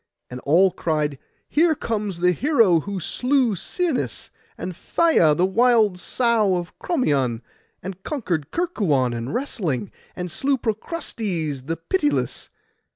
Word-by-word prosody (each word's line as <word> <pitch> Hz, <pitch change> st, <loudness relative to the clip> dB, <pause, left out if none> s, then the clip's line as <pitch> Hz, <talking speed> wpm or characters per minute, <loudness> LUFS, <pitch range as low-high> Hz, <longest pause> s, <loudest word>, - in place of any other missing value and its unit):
And 125 Hz, -, -6 dB
all 180 Hz, +6 st, +5 dB
cried, 150 Hz, -5 st, -1 dB, 0.3 s
'Here 320 Hz, +1 st, +3 dB
comes 210 Hz, -8 st, -3 dB
the 180 Hz, 0 st, +5 dB
hero 225 Hz, -, +3 dB
who 200 Hz, +3 st, -4 dB
slew 250 Hz, -, +1 dB
Sinis, 335 Hz, -, -2 dB, 0.3 s
and 180 Hz, -1 st, -5 dB
Phaia 175 Hz, -, +3 dB
the 180 Hz, -, +3 dB
wild 215 Hz, -2 st, +3 dB
sow 225 Hz, -2 st, +2 dB
of 175 Hz, 0 st, -5 dB
Crommyon, 135 Hz, -, 0 dB, 0.4 s
and 190 Hz, +1 st, -7 dB
conquered 180 Hz, -, -3 dB
Kerkuon 185 Hz, -, 0 dB
in 120 Hz, +3 st, -4 dB
wrestling, 165 Hz, -, -2 dB, 0.2 s
and 180 Hz, -1 st, -5 dB
slew 270 Hz, -, 0 dB
Procrustes 210 Hz, -, -3 dB
the 165 Hz, +1 st, -2 dB
pitiless. 295 Hz, -, -1 dB
190 Hz, 125 wpm, -23 LUFS, 160-250 Hz, 0.4 s, all